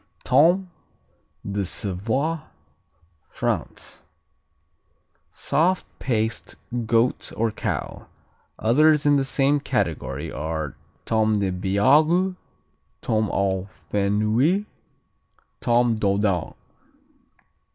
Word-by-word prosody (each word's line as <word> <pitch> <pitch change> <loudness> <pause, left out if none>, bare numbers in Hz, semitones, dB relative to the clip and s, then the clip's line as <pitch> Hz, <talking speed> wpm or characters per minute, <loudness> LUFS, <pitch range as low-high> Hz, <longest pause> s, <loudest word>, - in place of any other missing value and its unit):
Tome 175 +7 +3 0.8
de 100 0 -1
Savoie 110 - -1 0.9
France - - -4 1.3
Soft 180 +4 0
paste; 115 -3 -2 0.3
goat 115 +2 +1
or 115 0 +1
cow. 105 - -4 0.5
Others 150 +6 +3
in 145 -1 +5
the 135 - +1
same 140 +2 +2
category - - -2
are: 80 0 -4 0.3
Tome 110 -1 +2
des 100 -2 0
Beagues, 145 - +3 0.7
Tome 110 -1 0
au 95 -1 -1 0.2
Fenouil, 110 - +2 0.9
Tome 120 -1 +2
Doudane. 100 -4 0
115 Hz, 80 wpm, -23 LUFS, 100-145 Hz, 1.3 s, in